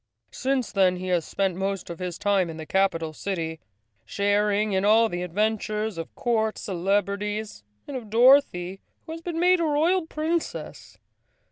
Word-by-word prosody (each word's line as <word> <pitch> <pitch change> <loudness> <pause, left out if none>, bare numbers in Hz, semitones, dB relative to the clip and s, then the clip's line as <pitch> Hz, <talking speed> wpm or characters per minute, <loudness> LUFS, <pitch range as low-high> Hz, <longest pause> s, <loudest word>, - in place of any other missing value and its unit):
Since 265 -2 -1
then 190 -2 +3
he 185 +1 -5
has 175 -3 +1
spent 195 -3 -1
most 195 -1 -3
of 170 - -8
his 180 -2 -4
time 200 -4 +1
in 160 - -7
the 160 - -7
capital 165 -4 0
city, 160 -2 -4 0.4
sharing 205 +1 +1
in 190 0 +1
all 220 +2 +5
the 175 -2 -4
adventures 215 +3 -1
of 165 - -7
court 220 -3 0
celebrities, 200 - -2 0.2
and 285 - -6
of 235 -5 -6
Dorothy, 225 -6 +4 0.2
who - - -8
has 330 0 -6
been 330 -1 -4
made 360 +1 +4
a - - +1
Royal 320 +3 +2
Princess. 320 +2 -4
205 Hz, 160 wpm, -25 LUFS, 185-240 Hz, 0.4 s, all